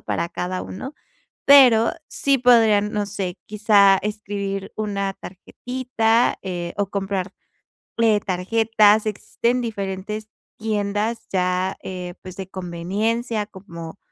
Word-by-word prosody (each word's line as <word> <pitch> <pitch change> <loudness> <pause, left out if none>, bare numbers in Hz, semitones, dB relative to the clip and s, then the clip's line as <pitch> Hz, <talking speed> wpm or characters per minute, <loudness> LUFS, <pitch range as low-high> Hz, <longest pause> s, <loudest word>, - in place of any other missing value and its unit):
para 170 - -2
cada 185 +2 -4
uno, 260 +10 -7 0.5
pero 250 -5 +7 0.2
sí 275 -1 +1
podrían, 225 -4 +4
no 210 -1 0
sé, 195 -3 -4
quizá 205 -2 +5
escribir 200 -1 -4
una 200 -2 -2
tarjetita, 235 +3 -1
eh, 175 -2 -4
o 200 -2 0
comprarle 195 -2 -4 0.7
tarjetas. 215 +3 +3
Existen 235 +4 -1
diferentes 210 -1 -4 0.3
tiendas 215 +1 -2
ya, 185 0 0
eh, 180 -1 -6
pues, 185 -1 -10
de 190 -1 -6
conveniencia 205 +6 -2
como 185 -3 -10
205 Hz, 105 wpm, -22 LUFS, 190-225 Hz, 0.7 s, pero